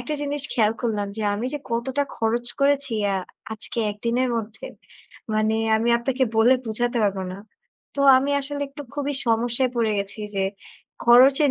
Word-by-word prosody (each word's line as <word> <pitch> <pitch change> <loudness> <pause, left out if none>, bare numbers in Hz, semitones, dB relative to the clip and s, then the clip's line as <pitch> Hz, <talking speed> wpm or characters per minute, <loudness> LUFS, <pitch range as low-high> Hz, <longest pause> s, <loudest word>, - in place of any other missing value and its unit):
একটা 300 +5 -4
জিনিস 290 -1 -2
খেয়াল 215 -2 +2
করলাম 215 -4 -1
যে 220 - -3
আমি 220 +4 -3
যে - - -2
কতটা 255 +4 0
খরচ 230 +2 -1
করেছি 280 -2 +2
অ্যা 200 -1 +1 0.4
আজকে 220 +2 -4
১ 205 - -8
দিনের 250 +2 +1
মধ্যে 220 -1 -6 0.7
মানে 215 +1 +1 0.2
আমি 225 +2 0
আপনাকে 260 +2 0
বলে 230 +4 +6
বুঝাতে 240 +2 -1
পারব 200 -1 0
না। 185 - -8 0.6
তো - - -1 0.2
আমি 275 +2 -1
আসলে 285 +1 -5
একটু 285 +1 -9
খুবই 290 0 -2
সমস্যায় 240 +2 +1
পড়ে 225 -2 +1
গেছি 200 +2 -4 0.2
যে 195 - +1 0.6
খরচের 265 +4 +6
240 Hz, 165 wpm, -23 LUFS, 220-275 Hz, 0.7 s, বলে